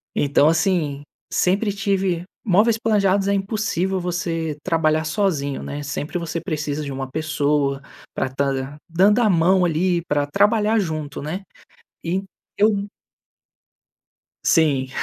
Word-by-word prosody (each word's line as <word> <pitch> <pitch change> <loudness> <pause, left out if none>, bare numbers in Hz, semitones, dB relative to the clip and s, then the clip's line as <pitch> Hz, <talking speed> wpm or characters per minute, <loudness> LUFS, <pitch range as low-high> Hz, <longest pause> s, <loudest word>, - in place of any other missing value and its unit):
então 145 0 +3
assim, 160 -4 0 0.3
sempre 200 +3 +1
tive 195 -3 0 0.2
móveis 215 +3 +4
planejados 200 -3 +2
é - - +2
impossível 195 -2 -1
você 165 -3 -2
trabalhar 160 -2 +1
sozinho, 155 -5 -1
né. 145 +1 -5
Sempre 145 +4 -4
você 165 0 -4
precisa 155 -3 -3
de 140 - -5
uma 135 -1 -5
pessoa, 145 -2 0 0.3
pra - - -1
estar 135 +1 -1
dan 135 +2 -5
dando 195 +7 +4
a 220 - +4
mão 180 +1 +4
ali 175 +1 +1
pra 145 -2 0
trabalhar 210 +6 +3
junto, 155 -6 -3
né, 165 +7 -4 0.6
e 180 +3 -1 0.4
eu. 205 -1 +3 1.6
Sim, 140 -5 +3
165 Hz, 130 wpm, -22 LUFS, 145-195 Hz, 1.6 s, móveis